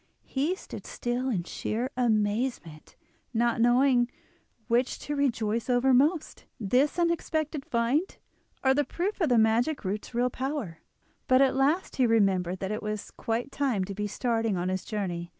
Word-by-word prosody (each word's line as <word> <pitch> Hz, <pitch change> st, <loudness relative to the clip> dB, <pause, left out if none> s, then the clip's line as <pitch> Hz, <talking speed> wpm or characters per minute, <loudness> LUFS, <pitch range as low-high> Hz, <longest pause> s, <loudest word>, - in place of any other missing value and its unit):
He 295 Hz, +7 st, 0 dB
stood -, -, -10 dB
still 245 Hz, +2 st, -2 dB
in 190 Hz, -8 st, -1 dB
sheer 235 Hz, +8 st, -3 dB
amazement, 215 Hz, -7 st, -1 dB, 0.4 s
not 235 Hz, 0 st, +2 dB
knowing 245 Hz, 0 st, +4 dB, 0.6 s
which 245 Hz, +1 st, +1 dB
to 295 Hz, -, -3 dB
rejoice 230 Hz, -5 st, 0 dB
over 250 Hz, +2 st, +3 dB
most—this 275 Hz, -, +1 dB
unexpected 315 Hz, -3 st, 0 dB
find, 250 Hz, +11 st, 0 dB, 0.5 s
or 265 Hz, 0 st, +5 dB
the 290 Hz, +2 st, +2 dB
proof 380 Hz, +7 st, -3 dB
of 320 Hz, -, +3 dB
the 245 Hz, -, +4 dB
magic 230 Hz, +5 st, +2 dB
root's 210 Hz, +5 st, -4 dB
real 245 Hz, +1 st, +1 dB
power; 260 Hz, -, -4 dB, 0.5 s
but 255 Hz, 0 st, +5 dB
at 270 Hz, -1 st, +4 dB
last 290 Hz, +7 st, +1 dB
he 255 Hz, -2 st, +4 dB
remembered 190 Hz, -5 st, +2 dB
that 190 Hz, +1 st, -2 dB
it 215 Hz, -, -3 dB
was 215 Hz, -1 st, -4 dB
quite 235 Hz, +4 st, -3 dB
time 265 Hz, -10 st, 0 dB
to 200 Hz, -, -6 dB
be 210 Hz, +1 st, -3 dB
starting 225 Hz, -2 st, 0 dB
on 175 Hz, +1 st, -1 dB
his 185 Hz, 0 st, -2 dB
journey. 175 Hz, -6 st, -4 dB
240 Hz, 155 wpm, -28 LUFS, 215-270 Hz, 0.6 s, or